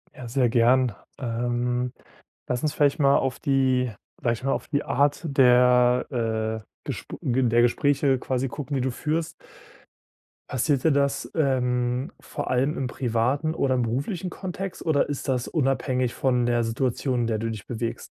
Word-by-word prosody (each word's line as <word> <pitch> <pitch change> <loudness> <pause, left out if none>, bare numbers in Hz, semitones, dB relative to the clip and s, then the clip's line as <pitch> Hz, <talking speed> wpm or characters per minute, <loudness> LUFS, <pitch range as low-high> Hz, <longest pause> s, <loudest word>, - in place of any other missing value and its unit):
Ja, 125 - -8
sehr 125 +1 +2
gern. 120 -1 +3 0.2
Ähm, 120 0 -1 0.6
lass 125 +2 -2
uns 150 - 0
vielleicht 145 +1 +2
mal 140 -1 +5
auf 130 -2 -1
die 130 -4 +2 0.3
vielleicht 120 0 -1
mal 135 - +1
auf - - -4
die 145 -1 -1
Art 145 +2 +1
der, 125 -3 +3
äh, - - -33 0.2
Gesp - - -6
Ge 130 +1 +1
der 120 0 +4
Gespräche 135 +2 +2
quasi 130 +1 -2
gucken, 145 +3 -6
die 130 - 0
du 130 - 0
führst. 155 +5 -2 1.2
Passiert 130 +1 0
dir 160 - +4
das, 140 0 0
ähm, 125 -1 0
vor 145 - -6
allem 135 +5 +1
im 130 - -1
privaten 130 +6 0
oder 130 -2 +1
im 125 - +1
beruflichen 145 - -2
Kontext, 190 0 -6
oder 150 -4 +2
ist 145 -1 -4
das 125 -2 0
unabhängig 130 -4 0
von 125 -2 +1
der 120 -1 +2
Situation, 125 +2 -1
in 115 - 0
der 110 -2 0
du 115 0 -2
dich 110 -3 -6
bewegst? 115 -1 -4
125 Hz, 165 wpm, -25 LUFS, 120-140 Hz, 1.2 s, mal